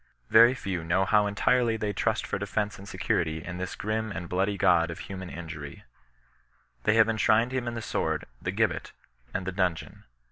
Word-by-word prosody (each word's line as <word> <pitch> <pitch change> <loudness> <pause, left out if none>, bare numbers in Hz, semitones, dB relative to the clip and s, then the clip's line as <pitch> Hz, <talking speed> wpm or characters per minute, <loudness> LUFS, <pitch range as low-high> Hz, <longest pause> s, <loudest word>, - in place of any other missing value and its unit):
Very 115 +3 +7
few 95 -8 -3
know 90 +4 +2
how 105 0 +3
entirely 115 +3 +2
they 105 -1 -2
trust - - 0
for - - -3
defence 105 -1 -2
and 100 +1 -10
security 80 -1 -1
in 90 - -5
this 90 0 -4
grim 110 +1 -2
and 85 -1 -5
Uoody 100 +3 0
god 85 -4 +4
of 85 - -6
human 95 -2 -7
injury 80 -4 -8
J^ - - -38
They 105 - +4
have 110 -1 +6
en 115 -1 0
shrined 110 +3 +3
him 130 -2 -2
in 120 - -3
the 115 - -5
sword, - - -1 0.2
the - - -3
gibbet, - - -1 0.4
and 95 - -3
the 95 - -2
dimgeon. 90 -3 -2
95 Hz, 200 wpm, -28 LUFS, 85-110 Hz, 0.4 s, Very